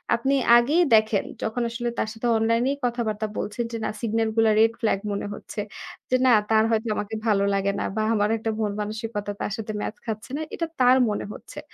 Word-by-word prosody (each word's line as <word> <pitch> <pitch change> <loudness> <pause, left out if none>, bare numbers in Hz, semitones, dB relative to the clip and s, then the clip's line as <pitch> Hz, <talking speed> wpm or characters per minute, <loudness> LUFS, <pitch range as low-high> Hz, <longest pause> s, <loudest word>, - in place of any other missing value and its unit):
আপনি 270 +4 +1 0.2
আগেই 290 +9 +3
দেখেন 215 -2 +3 0.2
যখন 220 +2 -2
আসলে 240 +1 -3
তার 215 - 0
সাথে 230 +1 -3
অনলাইনেই 230 +5 +1
কথাবার্তা 220 -3 -1
বলছেন 210 +3 -2
যে 230 - -3
না - - 0
সিগন্যালগুলা 225 0 +2
রেড 225 +1 +5
ফ্ল্যাগ 215 -3 +1
মনে 200 0 -3
হচ্ছে, 210 - -8 0.5
যে 255 - +3
না - - +6 0.2
তার 220 0 +5
হয়তো 225 0 0
আমাকে 210 +2 -4
ভালো 200 -2 +3
লাগে 195 0 +1
না - - -1
বা 215 - 0
আমার 210 -1 +2
একটা 225 0 -2
মনমানসিকতা 210 0 -3
তার - - -2
সাথে 220 -1 -5
ম্যাচ 215 - -4
খাচ্ছে 220 +1 -5
না - - -3
এটা 335 - -2
তার 250 +1 +6
মনে 210 - -2
হচ্ছে। - - -10
220 Hz, 195 wpm, -24 LUFS, 210-235 Hz, 0.5 s, না